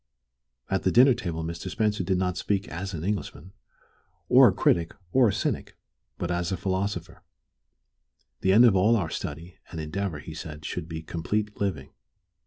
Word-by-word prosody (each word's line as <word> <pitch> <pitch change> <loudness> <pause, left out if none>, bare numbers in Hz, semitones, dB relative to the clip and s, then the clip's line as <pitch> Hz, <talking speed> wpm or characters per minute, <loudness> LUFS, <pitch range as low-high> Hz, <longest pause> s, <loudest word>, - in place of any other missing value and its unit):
At 95 - 0
the 95 - +1
dinner 130 +5 +7
Mr. 85 -5 -4
Spencer 105 0 0
did 95 +1 +1
not 90 -1 0
speak 100 0 -1
as 95 +3 -5
an 80 - -5
Englishman, 95 -3 -4 0.8
or - - +8
a - - +4
critic, 85 -1 +1 0.2
or 130 -2 +5
a - - +2
cynic, 100 - -3 0.4
but 85 - -3
as 90 0 -1
a 95 - -1
philosopher. 95 +3 -3 1.2
The 95 - +2
end 115 +5 +7
of 110 -5 +5
all 105 +5 +4
our 85 -7 -1
study 85 +4 -6
and 80 - -6
endeavor, 85 +2 -3
he 80 +2 -9
said, 75 -2 -8
should 85 -1 -4
be 80 -1 -5
complete 105 +6 -2
living. 80 -10 -2
95 Hz, 170 wpm, -26 LUFS, 85-100 Hz, 1.2 s, or